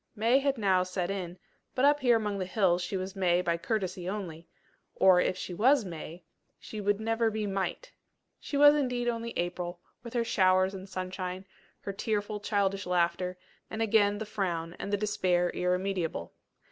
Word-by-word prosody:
May 230 +5 +3
had 275 -1 0
now 190 -4 +3
set 185 0 -2
in, 180 -2 -5 0.4
but 260 - +3
up 290 +1 +5
here 245 -4 +4
among 210 -2 -2
the 185 - -1
hills 185 -3 +2
she 180 +2 -3
was 190 +1 -5
May 180 -2 +2
by 170 -1 +1
courtesy 185 -2 -2
only: 175 -5 -6 0.5
or 185 -2 +6
if 185 - 0
she 185 - -5
was 245 +5 +4
May, 170 0 -8 0.3
she 215 - -7
would 205 0 +1
never 225 +1 +1
be 215 -1 -3
Might. 195 - -3 0.5
She 285 - -4
was, 290 +1 +8
indeed, 250 -4 0
only 230 -1 -2
April, 175 0 -3 0.2
with 235 +1 -9
her 235 - +2
showers 185 -3 +3
and 190 0 -8
sunshine, 185 0 -5 0.4
her 200 - -5
tearful, 210 0 -2
childish 200 -1 0
laughter, 180 +1 0 0.3
and 220 - -5
again 205 -2 +3
the 220 - -4
frown, 175 -6 -3
and 200 - -4
the 205 - +2
despair 185 -4 +1
irremediable. 180 - -2
195 Hz, 175 wpm, -29 LUFS, 180-220 Hz, 0.5 s, was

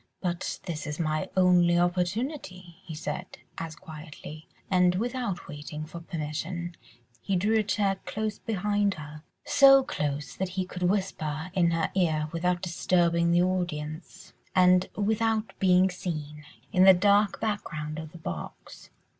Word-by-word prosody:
"But 175 -1 -3
this 160 -4 -4
is 150 +2 -5
my 155 -2 -1
only 175 -2 +5
opportunity," 180 - -2
he 160 - -8
said, 185 +4 -5 0.2
as 165 -1 -5
quietly, 155 -2 -10 0.2
and 180 -1 +3
without 240 -2 -2
waiting 150 0 -7
for 165 +2 -9
permission, 170 +1 -4 0.5
he 195 - -1
drew 210 +5 +2
a - - +2
chair 200 -1 0
close 215 +3 -3
behind 205 -1 0
her—so 270 - +3
close 150 - -3
that 190 -1 -1
he 185 - +1
could 180 0 -8
whisper 180 -5 -2
in 175 -3 +3
her 165 -1 0
ear, 155 -5 +1
without 175 +1 0
disturbing 170 -1 +2
the 175 +1 +4
audience, 175 0 -4 0.2
and 180 0 +5
without 220 +1 0
being 185 0 +4
seen, 150 -4 -5 0.3
in 185 -1 +5
the 190 -1 +9
dark 205 +2 +3
background 155 -8 -3
of 160 -1 -8
the 170 - -11
box. 85 - -8
180 Hz, 140 wpm, -28 LUFS, 160-195 Hz, 0.5 s, the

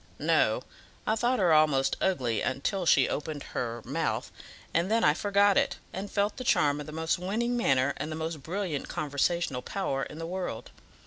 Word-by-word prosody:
"No; - - +2 0.4
I 220 - +2
thought 240 +3 +1
her 180 -5 +4
almost 150 -3 +4
ugly 125 - 0 0.2
till 195 -4 -1
she 135 -5 +5
opened 150 -1 -4
her 120 -1 -3
mouth, - - -2 0.4
and 170 +3 +1
then 225 +1 +2
I 150 - +5
forgot 200 +3 +3
it, - - -1 0.2
and 195 +2 -5
felt 205 0 0
the 255 - -4
charm 145 - +3
of 150 - -7
the - - -7
most 160 +2 -1
winning 225 +7 -1
manner 135 - +2
and 150 +3 -4
the - - -3
most 160 -1 -4
brilliant 175 -2 -3
conversational 145 -1 -1
power 140 -7 -2
in 150 - -6
the 165 - -5
world. 175 -10 -5
160 Hz, 185 wpm, -29 LUFS, 145-200 Hz, 0.4 s, she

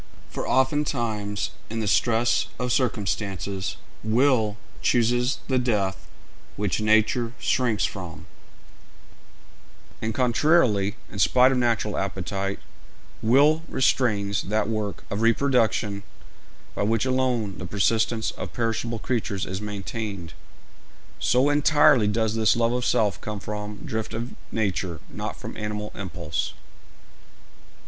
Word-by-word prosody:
For - - -4
oftentimes 120 -7 0 0.2
in 115 +1 -3
the 110 - -1
stress 115 +3 +2
of 125 0 -2
circumstances 100 -5 -1 0.3
will 110 -2 +2 0.2
chooses 120 +2 +2
the 130 -1 +2
death 100 - -1 0.5
which 105 0 -1
nature 110 +3 +2
shrinks 120 -5 +1
from; 90 -5 -7 1.8
and 110 - -1
contrarily, 120 - +3 0.2
in 100 - -7
spite 130 +5 +5
of 130 - +1
natural 115 -3 0
appetite, 95 0 -3 0.6
will 145 +7 +4
restrains 105 -7 +1
that 110 +3 0
work 110 -2 -3
of 100 - -2
reproduction 115 -4 +2 0.7
by - - -3
which 110 +3 +1
alone 125 -8 0
the 90 - -5
persistence 110 +4 +1
of 90 -3 -7
perishable 115 0 -1
creatures 105 -5 -2
is 95 +2 -5
maintained. 100 -3 -5 0.9
So 130 +3 +3
entirely 145 -5 +5
does 110 +1 +1
this 110 -1 +3
love 115 0 +2
of 125 0 0
self 105 -3 +1
come 105 -1 -5
from 105 +4 -6
drift 110 -7 -3
of 120 +2 -4 0.2
nature, 95 -6 -1
not - - -5
from - - -7
animal 105 0 -4
impulse. 85 -5 -4
110 Hz, 115 wpm, -25 LUFS, 100-120 Hz, 1.8 s, spite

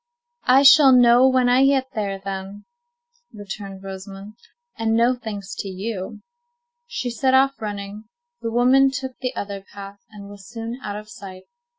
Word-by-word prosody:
"I 260 +2 +6
shall 275 0 +8
know 245 0 +6
when 255 -1 +2
I 250 +2 +4
get 270 -1 +2
there, 200 -3 -3
then," 195 +1 -7 0.7
returned 200 -2 -9
Rosamond, 195 +1 -9 0.4
"and 225 0 0
no 235 +2 +3
thanks 205 -5 -7
to - - -4
you." 195 +2 -6 0.6
She 245 - -4
set 260 +3 +1
off 270 0 +2
running. 205 0 -6 0.4
The 230 - -3
woman 255 +4 +4
took 265 -1 -6
the 255 -1 -4
other 200 -1 -5
path, 200 +1 -12
and 205 -2 -12
was 200 -1 -13
soon 230 +1 -6
out 205 -1 -5
of 210 0 -8
sight. 190 -2 -11
215 Hz, 160 wpm, -22 LUFS, 200-255 Hz, 0.7 s, shall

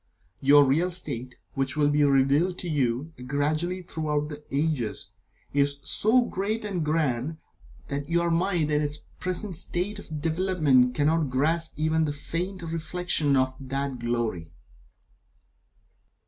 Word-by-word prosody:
Your 145 +1 +6
real 160 +7 +2
state, 130 -9 -5 0.2
which 135 +1 -2
will 145 -1 +4
be 145 0 +3
revealed 140 +6 +3
to 180 - -5
you, 140 0 0
gradually, 155 +7 -1
throughout 150 -3 -2
the 150 -1 -8
ages, 140 -6 -1 0.4
is 140 0 +2
so 225 - +3
great 215 0 -2
and 185 -5 -2
grand, 150 -2 0 0.5
that 140 0 -4
your 170 0 +2
mind 170 -2 +1
in 150 0 +2
its 150 0 -1 0.2
present 185 +2 -2
state 180 +4 -1
of 155 -6 -7
development 155 -7 +2
cannot 155 +1 +2
grasp 160 +6 +1
even 155 +1 +2
the 145 - -2
faint 175 +5 -4
reflection 165 -2 0
of 130 0 +2
that 135 -1 -3
glory. 115 -9 -2
150 Hz, 135 wpm, -26 LUFS, 140-170 Hz, 0.5 s, Your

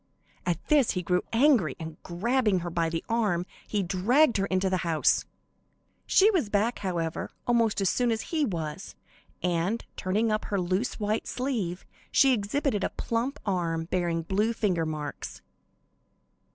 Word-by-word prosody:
At 175 -2 -2
this, 290 -6 +4
he 180 - -2
grew 180 +1 +1
angry, 230 - +4
and, 160 -1 -8
grabbing 210 +2 +1
her 175 0 -4
by 165 -1 0
the 165 0 -3
arm, 210 -7 +1 0.2
he 205 -2 0
dragged 230 - +3
her 195 0 0
into 185 0 +1
the 185 0 +1
house. 165 -3 +2 0.8
She 410 +3 +5
was 330 - 0
back, 215 +4 +1
however, 170 -4 -2 0.2
almost 230 -4 +2
as 195 - +3
soon 245 -1 +1
as 220 -1 -3
he 315 -2 +2
was, 165 - -4 0.5
and 180 +5 0
turning 215 +4 0
up 215 0 -1
her 200 - -1
loose 185 +8 -1
white 215 +1 -1
sleeve, 225 -10 -2 0.3
she 270 -1 +5
exhibited 215 0 0
a - - +1
plump 240 +5 -2
arm 170 -4 -1
bearing 170 -2 0
blue 205 +6 +1
finger 180 -8 0
marks. 155 -1 -6
195 Hz, 155 wpm, -28 LUFS, 175-230 Hz, 0.8 s, She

